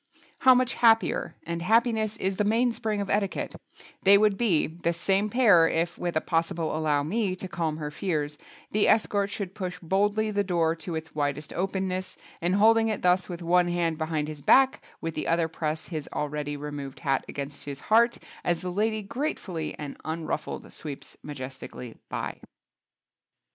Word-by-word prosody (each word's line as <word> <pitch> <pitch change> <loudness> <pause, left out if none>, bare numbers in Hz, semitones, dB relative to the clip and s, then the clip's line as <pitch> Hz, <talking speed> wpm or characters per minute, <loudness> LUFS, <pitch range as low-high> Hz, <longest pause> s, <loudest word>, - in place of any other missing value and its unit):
How 260 -1 +7
much 255 0 +2
happier—and 225 -7 +2
happiness 220 +1 +2
is 190 -2 -1
the 210 - +2
mainspring 225 -1 +1
of 200 - -4
etiquette—they 200 0 +1
would 210 -1 +3
be, 195 -7 +2
this 170 +1 -2
same 195 +4 +2
pair, 210 -9 +6
if 165 +1 0
(with 175 -2 -3
a - - +1
possible 165 -1 -1
"allow 150 -2 +1
me" 190 +4 0
to 190 0 -7
calm 165 -4 -2
her 150 -2 -4
fears) 150 -3 -2 0.3
the 210 0 +3
escort 205 -2 +3
should 200 -2 -5
push 185 -3 -4
boldly 205 +5 +1
the 205 0 +1
door 170 -3 +1
to 165 0 -5
its 160 0 -6
widest 145 0 -2
openness 185 0 -2 0.2
and 175 +3 +1
holding 225 +2 +5
it 215 -2 -2
thus 180 +1 +3
with 175 -1 -6
one 175 +1 +4
hand 170 -2 0
behind 155 -2 -1
his 150 -2 -7
back, 265 - +5 0.2
with 165 0 -3
the 155 - -3
other 165 0 +2
press 160 -1 -3
his 155 -5 -5
already 150 0 -3
removed 145 -2 -6
hat 135 -4 +1
against 140 0 -6
his 140 -1 -5
heart 235 +2 +4 0.3
as 175 -1 0
the 180 - -3
lady 215 +3 0
grateful 220 - -3 0.2
and 145 -2 -6
unruffled 160 -1 -4
sweeps 145 -3 -7
majestically 130 -4 -8
by. - - -4
175 Hz, 165 wpm, -27 LUFS, 155-205 Hz, 0.3 s, How